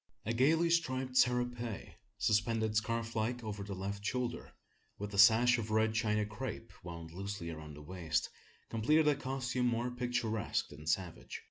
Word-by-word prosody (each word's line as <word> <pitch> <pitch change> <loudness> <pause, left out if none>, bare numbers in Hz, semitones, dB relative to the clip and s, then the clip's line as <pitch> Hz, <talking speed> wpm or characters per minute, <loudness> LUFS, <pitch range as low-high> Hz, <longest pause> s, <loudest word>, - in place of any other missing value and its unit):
A 115 - 0
gaily 160 +8 +3
striped 130 -6 0
serape, 125 -3 +1 0.3
suspended 110 +1 +1
scarf 115 +1 -1
like 120 +2 -1
over 105 -2 -4
the 100 -1 -5
left 100 +2 -4
shoulder, 125 +2 -2 0.5
with 105 +1 -5
a 100 - -1
sash 120 +4 +7
of 110 -1 -4
red 110 0 +2
China 105 -2 +1
crape 115 +2 -6
wound 85 -2 -7
loosely 95 -1 -5
around 75 -2 -8
the 75 - -10
waist, 80 -1 -1 0.4
completed 150 +8 +3
a 150 - +6
costume 130 -2 -1
more 120 +1 0
picturesque 120 -3 -1
than 75 +2 -11
savage. 85 +2 -2
110 Hz, 155 wpm, -34 LUFS, 100-125 Hz, 0.5 s, sash